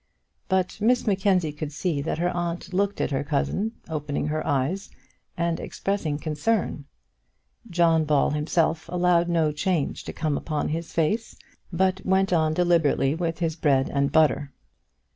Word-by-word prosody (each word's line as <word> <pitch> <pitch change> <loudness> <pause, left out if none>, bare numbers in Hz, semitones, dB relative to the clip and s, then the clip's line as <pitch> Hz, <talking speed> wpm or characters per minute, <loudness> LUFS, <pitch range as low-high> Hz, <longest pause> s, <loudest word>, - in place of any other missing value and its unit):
But 190 +1 0
Miss 245 +3 +3
Mackenzie 190 -6 +2
could 150 0 -5
see 150 0 -1
that 155 - -2
her 175 +2 0
aunt 175 +1 -4
looked 200 +2 0
at - - 0
her 135 +1 0
cousin, 175 +9 -1
opening 150 -3 -3
her 155 +1 -1
eyes, 145 +8 -1 0.5
and 170 -1 0
expressing 185 -7 -2
concern. 155 +1 -1 0.8
John 165 -3 +3
Ball 150 -1 +2
himself 160 +2 0
allowed 175 -1 +2
no 165 -3 +2
change 155 0 -1
to - - -4
come 155 -3 -1
upon 155 -2 -2
his 165 +2 -4
face, 210 +8 0 0.4
but 190 +2 +1
went 190 0 +2
on 155 -2 +2
deliberately 165 -6 +2
with 165 0 -2
his 165 -2 -1
bread 140 -5 +2
and 140 0 +1
butter. 145 -3 +3
165 Hz, 150 wpm, -25 LUFS, 150-180 Hz, 0.8 s, Miss